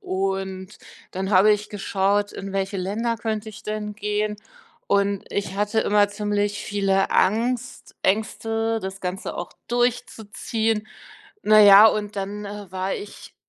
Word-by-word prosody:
und 190 Hz, 0 st, -3 dB, 0.4 s
dann 190 Hz, +2 st, -3 dB
habe 200 Hz, +2 st, +6 dB
ich 210 Hz, 0 st, -3 dB
geschaut, 205 Hz, 0 st, 0 dB
in 195 Hz, 0 st, -7 dB
welche 195 Hz, +1 st, -2 dB
Länder 220 Hz, +5 st, -2 dB
könnte 220 Hz, -1 st, -3 dB
ich 220 Hz, 0 st, -11 dB
denn 210 Hz, 0 st, -4 dB
gehen 210 Hz, 0 st, -2 dB, 0.5 s
und 200 Hz, -1 st, +1 dB
ich 200 Hz, -1 st, -3 dB
hatte 210 Hz, +2 st, +1 dB
immer 205 Hz, -1 st, +3 dB
ziemlich 205 Hz, 0 st, -1 dB
viele 195 Hz, -1 st, +1 dB
Angst 240 Hz, +5 st, 0 dB
Ängste 225 Hz, +2 st, 0 dB
das 190 Hz, 0 st, -6 dB
Ganze 185 Hz, +1 st, -4 dB
auch 175 Hz, -, -6 dB, 0.2 s
durchzuziehen. 225 Hz, -2 st, -1 dB, 0.6 s
Na 215 Hz, 0 st, +6 dB
ja 205 Hz, +1 st, +9 dB
und 210 Hz, -1 st, 0 dB
dann, 200 Hz, +2 st, -4 dB
äh, 205 Hz, -2 st, -8 dB
war 190 Hz, +1 st, -2 dB
ich 410 Hz, -, -10 dB
205 Hz, 140 wpm, -23 LUFS, 195-215 Hz, 0.6 s, ja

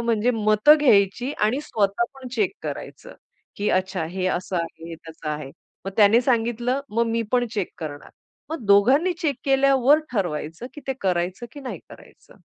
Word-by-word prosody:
म्हणजे 235 Hz, 0 st, +1 dB
मतं 215 Hz, +7 st, +5 dB
घ्यायची 245 Hz, 0 st, +3 dB
आणि 245 Hz, +7 st, +1 dB
स्वतः 205 Hz, -5 st, 0 dB
पण 260 Hz, -2 st, -9 dB
चेक 225 Hz, -, +1 dB
करायचं. -, -, -7 dB, 0.4 s
की 205 Hz, -, -1 dB
अच्छा 185 Hz, -2 st, 0 dB
हे 185 Hz, 0 st, -2 dB
असं 185 Hz, 0 st, -2 dB
आहे, 165 Hz, 0 st, -5 dB
तसं 160 Hz, -1 st, -8 dB
आहे. 150 Hz, -2 st, -5 dB, 0.3 s
मग 195 Hz, -, -3 dB
त्याने 215 Hz, +2 st, +6 dB
सांगितलं, 240 Hz, +1 st, 0 dB
मग 230 Hz, +2 st, 0 dB
मी 230 Hz, 0 st, 0 dB
पण 245 Hz, -1 st, +2 dB
चेक 200 Hz, -4 st, -1 dB
करणार. 145 Hz, -3 st, -7 dB, 0.4 s
मग 320 Hz, -7 st, -5 dB
दोघांनी 260 Hz, -, +4 dB
चेक 290 Hz, -5 st, 0 dB
केल्यावर 275 Hz, +1 st, +4 dB
ठरवायचं, 170 Hz, 0 st, -3 dB
की 295 Hz, -, -9 dB
ते 270 Hz, -, 0 dB
करायचं 185 Hz, +3 st, -1 dB
की 285 Hz, -, -10 dB
नाही 260 Hz, -, -6 dB
करायचं. -, -, -17 dB
220 Hz, 165 wpm, -23 LUFS, 185-255 Hz, 0.4 s, त्याने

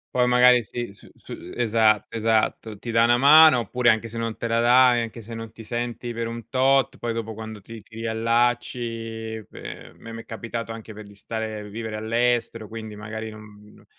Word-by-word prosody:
Poi 125 Hz, -1 st, +4 dB
magari 125 Hz, 0 st, +5 dB
si 120 Hz, +1 st, -6 dB
s 100 Hz, -, -17 dB, 0.2 s
s -, -, -9 dB
esatto, 110 Hz, -3 st, +2 dB
esatto, 110 Hz, -1 st, 0 dB
ti 120 Hz, -, -8 dB
dà 115 Hz, 0 st, +4 dB
una 120 Hz, +1 st, +4 dB
mano, 150 Hz, +1 st, +8 dB
oppure 120 Hz, +2 st, +2 dB
anche 110 Hz, +1 st, -1 dB
se 115 Hz, +1 st, -9 dB
non 115 Hz, -1 st, -3 dB
te 115 Hz, -, -3 dB
la 115 Hz, 0 st, +1 dB
da 125 Hz, +1 st, +5 dB
e -, -, +1 dB
anche 115 Hz, 0 st, -8 dB
se 115 Hz, +1 st, -9 dB
non 115 Hz, 0 st, -7 dB
ti 115 Hz, -, -13 dB
senti 120 Hz, +1 st, -4 dB
per 115 Hz, 0 st, -3 dB
un 115 Hz, 0 st, -7 dB
tot, 135 Hz, +1 st, +2 dB
poi 120 Hz, -1 st, -3 dB
dopo 110 Hz, -1 st, -5 dB
quando 110 Hz, -1 st, -8 dB
ti 115 Hz, +3 st, -10 dB
ti 115 Hz, -, -25 dB
riallacci 115 Hz, -1 st, -1 dB
pe -, -, -9 dB
a -, -, -19 dB
me 115 Hz, -, -12 dB
m'è 115 Hz, 0 st, -8 dB
capitato 115 Hz, 0 st, -6 dB
anche 115 Hz, -1 st, -9 dB
per 105 Hz, 0 st, -10 dB
di 100 Hz, -, -15 dB
stare, 110 Hz, 0 st, -6 dB
vivere 110 Hz, +1 st, -5 dB
all'estero, 115 Hz, 0 st, 0 dB
quindi 110 Hz, -1 st, -8 dB
magari 110 Hz, +1 st, -6 dB
non 105 Hz, -1 st, -15 dB
115 Hz, 200 wpm, -24 LUFS, 110-120 Hz, 0.2 s, mano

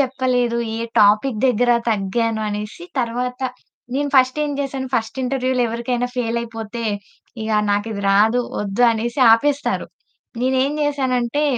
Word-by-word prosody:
చెప్పలేదు, 255 Hz, -3 st, +1 dB, 0.2 s
ఏ -, -, -3 dB, 0.2 s
టాపిక్ 215 Hz, +3 st, +4 dB
దగ్గర 245 Hz, 0 st, +2 dB, 0.2 s
తగ్గాను 220 Hz, +2 st, 0 dB
అనేసి 210 Hz, +11 st, -5 dB, 0.2 s
తర్వాత, 250 Hz, +2 st, -2 dB, 0.6 s
నేను 285 Hz, 0 st, -1 dB
ఫస్టేం 265 Hz, +3 st, +3 dB
జేసాను. 270 Hz, -1 st, -3 dB
ఫస్ట్ 230 Hz, +4 st, -2 dB
ఇంటర్వ్యూలో 255 Hz, -1 st, 0 dB
ఎవరికైనా 240 Hz, +2 st, -2 dB
ఫెయిలయిపోతే 230 Hz, -1 st, -3 dB, 0.6 s
ఇగ 220 Hz, -, -3 dB, 0.2 s
నాకిది 205 Hz, 0 st, -1 dB
రాదు, 220 Hz, +5 st, +4 dB, 0.2 s
వద్దు 210 Hz, +4 st, +1 dB
అనేసి 235 Hz, +4 st, -2 dB
ఆపేస్తారు. 285 Hz, +5 st, +1 dB, 0.6 s
నేనేం 260 Hz, +2 st, +2 dB
జేసానంటే, 270 Hz, -1 st, 0 dB
245 Hz, 115 wpm, -20 LUFS, 225-260 Hz, 0.6 s, టాపిక్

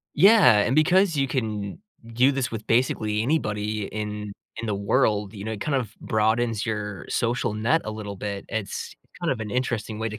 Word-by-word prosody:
Yeah, 185 Hz, -, +7 dB
and 120 Hz, +5 st, +2 dB
because 175 Hz, +3 st, +4 dB
you 135 Hz, -1 st, +2 dB
can 105 Hz, -6 st, -3 dB, 0.3 s
do 130 Hz, +4 st, +4 dB
this 135 Hz, -2 st, -1 dB
with 110 Hz, -1 st, -6 dB
basically 110 Hz, -3 st, +1 dB
anybody 110 Hz, -6 st, -1 dB
in 105 Hz, -1 st, -5 dB, 0.3 s
in 115 Hz, -, -4 dB
the 105 Hz, -, 0 dB
world, 100 Hz, 0 st, +1 dB
you 100 Hz, -3 st, -8 dB
know, 110 Hz, -, -3 dB
it 105 Hz, -, -6 dB
kind 150 Hz, -, -1 dB
of 115 Hz, -5 st, -1 dB
broadens 110 Hz, +1 st, +1 dB
your 105 Hz, -3 st, -4 dB
social 115 Hz, -2 st, 0 dB
net 115 Hz, +10 st, +2 dB
a 110 Hz, -, -3 dB
little 105 Hz, -2 st, -6 dB
bit; 100 Hz, 0 st, -5 dB
it's 110 Hz, -3 st, -4 dB, 0.3 s
kind 170 Hz, -, +1 dB
of 120 Hz, -, -5 dB
an 105 Hz, -, -4 dB
interesting 115 Hz, -3 st, -2 dB
way 110 Hz, -, -1 dB
to 105 Hz, -, -7 dB
110 Hz, 195 wpm, -25 LUFS, 105-130 Hz, 0.3 s, Yeah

